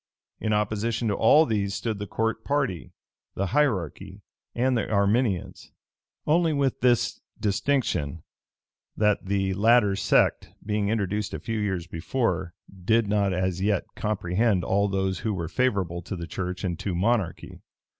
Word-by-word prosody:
In 110 Hz, -, -1 dB
opposition 110 Hz, +2 st, 0 dB
to -, -, +1 dB
all 145 Hz, +10 st, +5 dB
these 100 Hz, -5 st, -1 dB
stood 110 Hz, -3 st, -3 dB
the 105 Hz, -, -5 dB
court 115 Hz, +2 st, -2 dB
party, 135 Hz, -, -1 dB, 0.4 s
the 100 Hz, -, -1 dB
hierarchy, 100 Hz, -, -1 dB, 0.3 s
and 130 Hz, +2 st, +2 dB
the 115 Hz, -, -1 dB
Arminians; 100 Hz, -1 st, 0 dB, 0.5 s
only 165 Hz, +1 st, +3 dB
with 140 Hz, -3 st, 0 dB
this 120 Hz, -2 st, +2 dB, 0.2 s
distinction, 100 Hz, -, 0 dB, 0.7 s
that 105 Hz, -2 st, +1 dB
the 95 Hz, -1 st, 0 dB
latter 105 Hz, 0 st, +4 dB
sect, -, -, +2 dB, 0.2 s
being 105 Hz, -1 st, 0 dB
introduced 105 Hz, -2 st, -1 dB
a -, -, -5 dB
few 115 Hz, +7 st, -3 dB
years 95 Hz, -5 st, -2 dB
before, 90 Hz, +1 st, -2 dB, 0.3 s
did 115 Hz, +2 st, +3 dB
not 100 Hz, -1 st, +1 dB
as 90 Hz, 0 st, -1 dB
yet 100 Hz, -1 st, +1 dB
comprehend 100 Hz, -1 st, 0 dB
all 100 Hz, +3 st, +2 dB
those 95 Hz, -2 st, -1 dB
who 110 Hz, -3 st, -2 dB
were 85 Hz, -3 st, -3 dB
favorable 95 Hz, -6 st, 0 dB
to 95 Hz, -, -6 dB
the 85 Hz, -2 st, -5 dB
church 90 Hz, +2 st, -5 dB
and 85 Hz, -3 st, -2 dB
to 95 Hz, -4 st, -3 dB
monarchy. 100 Hz, -1 st, -1 dB
100 Hz, 145 wpm, -26 LUFS, 95-115 Hz, 0.7 s, all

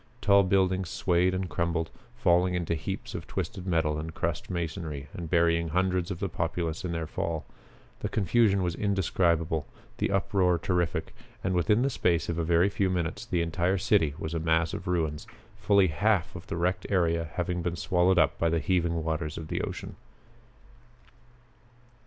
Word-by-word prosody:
Tall 100 Hz, -3 st, +5 dB
buildings 95 Hz, -1 st, +1 dB
swayed 90 Hz, 0 st, +1 dB
and 95 Hz, 0 st, -2 dB
crumbled, 85 Hz, 0 st, -1 dB, 0.2 s
falling 90 Hz, -5 st, +3 dB
into 85 Hz, -1 st, -1 dB
heaps 80 Hz, -, -4 dB
of -, -, -6 dB
twisted 95 Hz, 0 st, -4 dB
metal 80 Hz, -3 st, +1 dB
and 80 Hz, +1 st, -6 dB
crushed -, -, -2 dB
masonry 80 Hz, -4 st, -4 dB
and 85 Hz, -2 st, -6 dB
burying 85 Hz, -1 st, +3 dB
hundreds 90 Hz, +1 st, 0 dB
of 90 Hz, -3 st, -4 dB
the 100 Hz, -, -1 dB
populace 85 Hz, -1 st, -2 dB
in 90 Hz, -, -3 dB
their 80 Hz, -1 st, -2 dB
fall. 80 Hz, 0 st, -3 dB, 0.5 s
The -, -, -3 dB
confusion 100 Hz, -1 st, +2 dB
was 90 Hz, -1 st, 0 dB
indescribable, 85 Hz, -5 st, +1 dB, 0.3 s
the -, -, +1 dB
uproar 95 Hz, -2 st, +2 dB
terrific, 85 Hz, -1 st, -1 dB, 0.3 s
and 95 Hz, -, 0 dB
within 105 Hz, +7 st, +3 dB
the 135 Hz, -, +2 dB
space 85 Hz, -7 st, +1 dB
of 85 Hz, 0 st, -1 dB
a -, -, +1 dB
very 85 Hz, +3 st, +3 dB
few 100 Hz, -1 st, 0 dB
minutes 85 Hz, -3 st, -2 dB
the 85 Hz, -2 st, +1 dB
entire 85 Hz, +3 st, 0 dB
city 85 Hz, -6 st, +2 dB
was 80 Hz, +1 st, -5 dB
a 85 Hz, -, -1 dB
mass 80 Hz, 0 st, +1 dB
of -, -, -6 dB
ruins, 80 Hz, -4 st, -1 dB, 0.3 s
fully 100 Hz, -2 st, +4 dB
half 95 Hz, +4 st, +1 dB
of 90 Hz, -, -9 dB
the -, -, -3 dB
wrecked 90 Hz, +2 st, 0 dB
area 85 Hz, -4 st, +1 dB
having 90 Hz, 0 st, -1 dB
been 85 Hz, 0 st, -2 dB
swallowed 90 Hz, +1 st, +2 dB
up 80 Hz, -4 st, +3 dB
by 85 Hz, -, +2 dB
the 85 Hz, -, +1 dB
heaving 85 Hz, 0 st, 0 dB
waters 80 Hz, -1 st, -2 dB
of 80 Hz, -1 st, -7 dB
the -, -, -1 dB
ocean. -, -, -6 dB
85 Hz, 175 wpm, -28 LUFS, 80-95 Hz, 0.5 s, Tall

